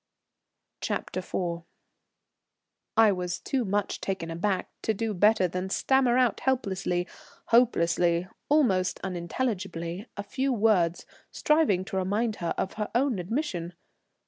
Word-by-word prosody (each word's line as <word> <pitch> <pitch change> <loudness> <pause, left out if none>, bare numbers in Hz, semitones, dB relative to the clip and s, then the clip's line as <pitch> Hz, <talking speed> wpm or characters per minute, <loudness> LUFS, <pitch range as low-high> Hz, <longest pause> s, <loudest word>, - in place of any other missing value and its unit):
CHAPTER - - -3
IV. 175 -2 -3 1.4
I 225 -2 +7
was 180 -2 -3
too 265 -3 -1
much 205 -1 -1
taken 180 -4 -3
aback 185 +3 -1
to 220 - 0
do 225 +1 -2
better 205 0 +4
than 185 +2 -4
stammer 255 +3 +3
out 250 -2 +2
helplessly, 190 -8 0 0.4
hopelessly, 175 -7 +3 0.2
almost 195 -12 +2
unintelligibly, 185 0 -3
a 200 - -3
few 265 +7 -1
words 200 -7 +2 0.2
striving 300 - +2
to 195 -1 -4
remind 210 +4 0
her 170 -1 -2
of 190 - -2
her 210 - -2
own 250 -4 +2
admission. 180 - -3
195 Hz, 120 wpm, -27 LUFS, 180-235 Hz, 1.4 s, I